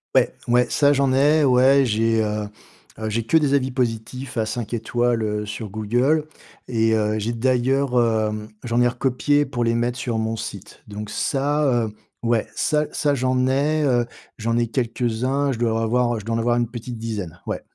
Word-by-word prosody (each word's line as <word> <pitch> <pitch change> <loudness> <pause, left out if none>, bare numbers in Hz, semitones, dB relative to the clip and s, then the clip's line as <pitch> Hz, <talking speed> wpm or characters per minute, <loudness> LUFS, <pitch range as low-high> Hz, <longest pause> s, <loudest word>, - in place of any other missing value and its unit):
Ouais, - - +4
ouais. 125 +1 +3
Ça 145 -1 +4
j'en 140 -2 +2
ai. 150 +3 +4
Ouais, 135 +1 +5
j'ai, 115 0 +1
heu 105 0 -2 0.5
heu, 110 - -3
j'ai 115 +2 -1
que 160 +8 +4
des 145 -3 +2
avis 135 -2 +2
positifs 125 +1 -3
à 110 - +1
5 120 -1 -4
étoiles, 120 +1 0
heu, 105 0 -2
sur 105 +1 -6
Google 120 +9 +1 0.4
et 115 -2 +1
heu, 110 0 0
j'ai 110 +3 -2
d'ailleurs, 130 +3 +1
hem, 110 -2 0 0.2
j'en 120 0 +1
ai 120 - +5
recopié 135 +4 +1
pour 125 -3 -2
les 115 0 +1
mettre 120 +1 -1
sur 120 -3 -2
mon 110 0 -1
site. 105 -2 -8
Donc, 105 0 -7
ça, 145 +1 0 0.2
heu, 110 - -6 0.3
ouais, 115 -2 +1
ça 150 -1 +1
ça 145 -2 +1
j'en 130 -1 +1
ai, 145 +4 +1
heu, 120 -4 +2 0.3
j'en 115 +1 0
ai 120 - +2
quelques-uns. 125 +3 -1
Je 120 - -4
dois 115 -1 +1
avoir 120 0 +1
je 105 - -11
dois 115 0 -1
en - - 0
avoir 120 +1 +2
une 120 -1 +1
petite 120 0 -7
dizaine. 105 -7 -5
Ouais. - - -3
120 Hz, 195 wpm, -22 LUFS, 110-130 Hz, 0.5 s, Ouais